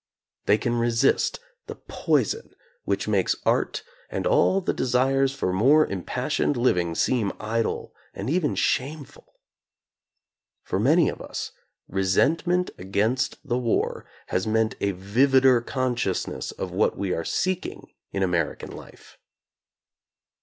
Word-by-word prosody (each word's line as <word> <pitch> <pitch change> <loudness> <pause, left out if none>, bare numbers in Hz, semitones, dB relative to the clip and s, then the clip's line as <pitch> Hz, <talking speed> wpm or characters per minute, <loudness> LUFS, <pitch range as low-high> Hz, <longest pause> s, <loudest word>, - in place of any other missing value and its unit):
They 105 - +5
can 120 0 -1
resist 115 -1 +2 0.3
the - - -6
poison 455 - -1 0.3
which - - -1
makes - - +2
art - - +1 0.3
and - - -3
all - - +3
the 185 - -1
desires 135 +2 +2
for 135 -9 -2
more 140 +11 +5
impassioned 125 - -1
living 90 -9 +1
seem 110 -2 +1
idle 115 +1 -2 0.2
and 100 - -6
even 155 +1 +1
shameful. 140 +1 -2 1.3
For - - -2
many 155 - +4
of - - -4
us, - - -5 0.4
resentment 160 - +1
against 110 +10 -1
the 125 -1 0
war 120 -3 -1 0.2
has 95 +3 -1
meant 110 0 +1
a 100 - +1
vivider 125 +6 +3
consciousness 125 -7 -2
of 95 - -5
what 95 +4 +1
we 95 -2 -1
are 85 - -2
seeking 185 - -2 0.2
in 95 - -1
American 85 -4 -1
life. - - -13
120 Hz, 125 wpm, -25 LUFS, 100-135 Hz, 1.3 s, They